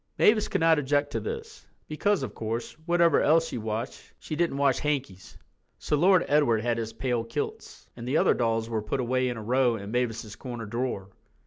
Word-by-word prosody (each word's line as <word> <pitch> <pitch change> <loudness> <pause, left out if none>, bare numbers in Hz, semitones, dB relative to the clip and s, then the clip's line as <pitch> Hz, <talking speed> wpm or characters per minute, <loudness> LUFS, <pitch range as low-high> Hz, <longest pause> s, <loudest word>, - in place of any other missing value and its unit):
Mavis 215 0 +4
could - - -1
not 165 -1 +5
object 145 +1 0
to - - -1
this, 450 -1 -7 0.2
because, 200 +6 0
of - - -5
course, 115 +1 -4
whatever 170 -1 +4
else 165 +2 +4
she 120 - -4
washed 110 +3 -5
she 155 - -6
didn't 170 -3 0
wash 140 -2 +2
hankies. 135 -11 -3 0.4
So - - -1
Lord 180 +4 +4
Edward 140 -7 +3
had 115 0 0
his 115 -1 -4
pale 120 0 -1
kilts, 115 0 -6
and 120 0 -8
the 140 +5 +2
other - - +4
dolls 115 -2 0
were 115 -2 -2
put 105 +5 -3
away 130 +1 +1
in 120 - -4
a 110 - -6
row 125 +1 +2
in 100 -1 -7
Mavis's 115 -3 -2
corner 120 -3 -7
drawer. 110 -3 -3
125 Hz, 200 wpm, -27 LUFS, 115-150 Hz, 0.4 s, not